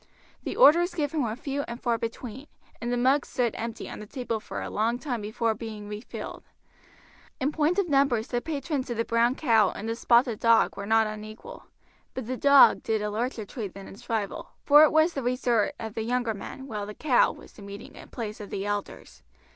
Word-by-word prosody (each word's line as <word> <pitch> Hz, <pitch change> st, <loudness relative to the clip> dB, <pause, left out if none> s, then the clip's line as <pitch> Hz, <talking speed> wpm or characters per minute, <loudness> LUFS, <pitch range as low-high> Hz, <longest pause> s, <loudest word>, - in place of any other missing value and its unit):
The -, -, -4 dB
orders 345 Hz, -5 st, +6 dB
given 300 Hz, -1 st, -1 dB
were 225 Hz, -4 st, -1 dB
few 275 Hz, +2 st, -3 dB
and 235 Hz, +1 st, -6 dB
far 235 Hz, -2 st, 0 dB
between, 240 Hz, +4 st, -6 dB, 0.3 s
and 240 Hz, +1 st, -2 dB
the 245 Hz, -, 0 dB
mugs 265 Hz, +4 st, +2 dB
stood 240 Hz, -3 st, 0 dB
empty 230 Hz, 0 st, -5 dB
on -, -, -8 dB
the 210 Hz, -, -9 dB
table 240 Hz, -2 st, -3 dB
for -, -, -6 dB
a -, -, -5 dB
long 225 Hz, +3 st, 0 dB
time 245 Hz, -4 st, -4 dB
before 220 Hz, +2 st, -1 dB
being 215 Hz, -1 st, -8 dB
refilled. 210 Hz, +2 st, -7 dB, 1.0 s
In 280 Hz, +1 st, 0 dB
point 315 Hz, +4 st, +1 dB
of 400 Hz, -3 st, +2 dB
numbers 275 Hz, -6 st, +2 dB
the 240 Hz, -1 st, -1 dB
patrons 285 Hz, -3 st, -3 dB
of 240 Hz, -, -3 dB
the 230 Hz, -, 0 dB
"Brown 235 Hz, +2 st, +2 dB
Cow" 225 Hz, -9 st, +3 dB
and 215 Hz, -, -6 dB
the 225 Hz, -, -1 dB
"Spotted 235 Hz, -1 st, +3 dB
Dog" 230 Hz, -1 st, +4 dB
were 200 Hz, 0 st, -6 dB
not 220 Hz, 0 st, +4 dB
unequal; 215 Hz, -, -8 dB, 0.5 s
but 260 Hz, -, -4 dB
the 255 Hz, +3 st, -3 dB
"Dog" 280 Hz, +1 st, +6 dB
did 220 Hz, -1 st, -1 dB
a 210 Hz, -, -2 dB
larger 230 Hz, 0 st, -3 dB
trade 205 Hz, -3 st, -6 dB
than 195 Hz, -1 st, -9 dB
its 240 Hz, +6 st, -13 dB
rival, 215 Hz, -4 st, -2 dB
for 295 Hz, +1 st, +7 dB
it 310 Hz, -, +5 dB
was 315 Hz, +2 st, +4 dB
the 275 Hz, -, -3 dB
resort 245 Hz, 0 st, +1 dB
of 220 Hz, -2 st, -6 dB
the 225 Hz, -, -3 dB
younger 240 Hz, 0 st, 0 dB
men, 265 Hz, +6 st, -8 dB
while 210 Hz, -5 st, -5 dB
the 210 Hz, -, -8 dB
"Cow" 270 Hz, -6 st, +3 dB
was -, -, -14 dB
the -, -, -14 dB
meeting 200 Hz, +2 st, -9 dB, 0.2 s
place 215 Hz, -3 st, -6 dB
of 205 Hz, -, -8 dB
the 195 Hz, 0 st, -4 dB
elders. 205 Hz, -1 st, -5 dB
235 Hz, 210 wpm, -27 LUFS, 215-270 Hz, 1.0 s, for